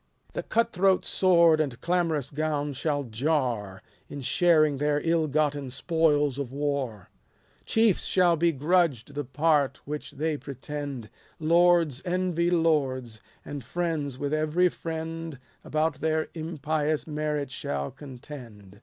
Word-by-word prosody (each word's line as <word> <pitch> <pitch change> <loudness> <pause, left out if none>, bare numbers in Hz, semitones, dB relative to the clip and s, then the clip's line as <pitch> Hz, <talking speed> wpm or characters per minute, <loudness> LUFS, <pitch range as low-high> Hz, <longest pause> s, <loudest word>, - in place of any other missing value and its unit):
The - - -2
cut 230 +1 0
throat 190 0 +3
sword 170 -4 +4
and 135 -6 -3
clamorous 165 -6 0
gown 150 -1 -1
shall 145 +1 -1
jar, 120 -6 -1 0.3
In 145 - -6
sharing 155 0 +3
their 145 +1 +1
ill 165 -1 +1
gotten 145 -2 0
spoils 145 -1 +1
of 135 -3 -4
war: 140 -8 -3 0.5
Chiefs 225 -4 +2
shall 180 -2 +3
be 170 +1 +2
grudged 150 -4 +1
the 145 +1 -3
part 145 +1 +1
which 150 +1 -6
they 155 +1 -1
pretend; 140 -3 -6 0.3
Lords 170 -3 +3
envy 180 -2 0
lords, 135 -9 0 0.2
and 145 -2 -6
friends 155 -2 -2
with 145 +2 -2
every 155 +4 +2
friend 165 -2 -5 0.3
About 155 -1 -1
their 160 0 0
impious 155 -1 -2
merit 150 -3 -2
shall 70 - -3
contend. 120 -7 -11
150 Hz, 125 wpm, -27 LUFS, 140-165 Hz, 0.5 s, sword